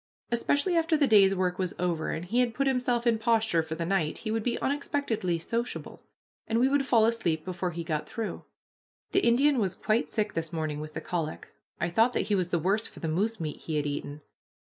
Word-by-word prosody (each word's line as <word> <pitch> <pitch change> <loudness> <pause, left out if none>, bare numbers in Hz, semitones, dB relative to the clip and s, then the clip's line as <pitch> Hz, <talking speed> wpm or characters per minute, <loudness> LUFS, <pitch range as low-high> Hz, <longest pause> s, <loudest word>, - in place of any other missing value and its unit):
Especially 285 +9 +1
after 325 -1 +3
the 295 - +4
day's 200 -5 +6
work 180 -1 -1
was 185 -3 -2
over, 170 -3 -1
and 165 - -3
he 230 +7 0
had 240 -3 +1
put 275 - +1
himself 250 -2 +1
in 230 -2 +3
posture 225 -6 +2
for 160 0 -5
the 165 +1 -3
night, 170 -4 0
he 215 - -4
would 225 0 0
be 235 +2 -1
unexpectedly 270 -10 -1
sociable, 235 +8 -4 0.5
and 225 - +1
we 255 - +4
would 275 0 +1
fall 225 -4 +5
asleep 170 -9 0
before 185 0 -2
he 170 0 -5
got 155 -2 -3
through. 225 -2 -4 0.7
The - - +4
Indian 265 +3 +4
was 190 -4 0
quite 215 +2 0
sick 215 -2 -1
this 165 -1 -3
morning 155 -3 -2
with 155 0 -8
the - - -3
colic. 165 -3 -4 0.3
I - - 0
thought 225 +7 +3
that - - +1
he - - +2
was 185 -3 +1
the 175 - 0
worse 195 +7 +1
for - - -13
the 165 - -3
moose 205 +7 0
meat 155 -2 -4
he 160 - -4
had 150 -1 0
eaten. 145 0 -4
205 Hz, 225 wpm, -28 LUFS, 165-235 Hz, 0.7 s, day's